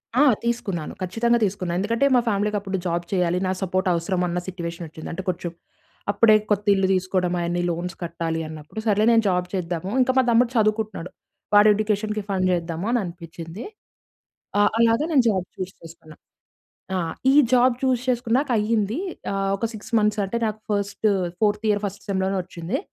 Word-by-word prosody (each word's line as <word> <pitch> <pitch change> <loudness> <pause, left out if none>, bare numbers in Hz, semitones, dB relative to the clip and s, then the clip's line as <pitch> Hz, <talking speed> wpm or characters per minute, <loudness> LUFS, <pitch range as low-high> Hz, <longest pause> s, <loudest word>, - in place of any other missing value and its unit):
ఆ! 260 - +4 0.2
తీసుకున్నాను. 200 -9 -2
ఖచ్చితంగా 235 +6 +1
తీసుకున్నాను. 185 -3 -2
ఎందుకంటే 230 +7 +1
మా 245 - +5
ఫ్యామిలీకి 210 0 +1
అప్పుడు 195 -1 -3
జాబ్ 170 0 -1
చేయాలి, 180 -1 +1
నా - - +1
సపోర్ట్ 185 +1 0
అవసరం 175 +2 -1
అన్న 175 +1 -1
సిట్యుయేషన్ 170 -2 -5
వచ్చింది. 160 0 -9
అంటే 190 +3 -5
కొంచెం, 175 -1 -3 0.6
అప్పుడే 215 +1 +5 0.2
కొత్త 205 0 +1
ఇల్లు 195 -1 +2
తీసుకోవడం, 185 -1 0
అయన్నీ 175 +1 -1
లోన్స్ 175 +2 -4
కట్టాలి 165 -1 -3
అన్నప్పుడు, 155 +5 -8
సర్లే 210 0 +3
నేను 225 -1 +4
జాబ్ 180 -1 0
చేద్దాము 180 0 -3
ఇంకా 255 +1 +2
మా - - +5
తమ్ముడు 235 +1 +4
చదువుకుంటున్నాడు. 215 -4 0 0.4
వాడు 205 +1 +7
ఎడ్యుకేషన్‌కి 210 0 -1
ఫండ్ 185 -2 +1
చేద్దామని 175 +7 -1
అనిపించింది. 170 +2 -8 0.9
ఆ! - - +6 0.2
అలాగే 230 +5 +3
నేను 265 -5 +5
జాబ్ 190 -4 0
చూస్ 185 +1 -5
చేసుకున్నా. 165 -1 -13 0.8
ఆ! - - +1 0.4
ఈ - - +3 0.2
జాబ్ 250 0 +5
చూస్ 255 -2 +2
చేసుకున్నాకాయ్యింది. 230 -2 +1 0.3
ఆహ్, 195 0 0
ఒక 230 - -2
6 220 0 -10
మంత్స్ 210 0 +1
అంటే 195 +5 -2
నాకు 215 0 -4
ఫస్టు, 205 +1 0 0.3
ఫోర్త్ 210 0 +1
ఇయర్ 205 -1 +2
ఫస్ట్ 200 +1 -6
సెమ్‌లోనే 190 0 0
వచ్చింది. 175 +6 -4
195 Hz, 160 wpm, -23 LUFS, 175-220 Hz, 0.9 s, వాడు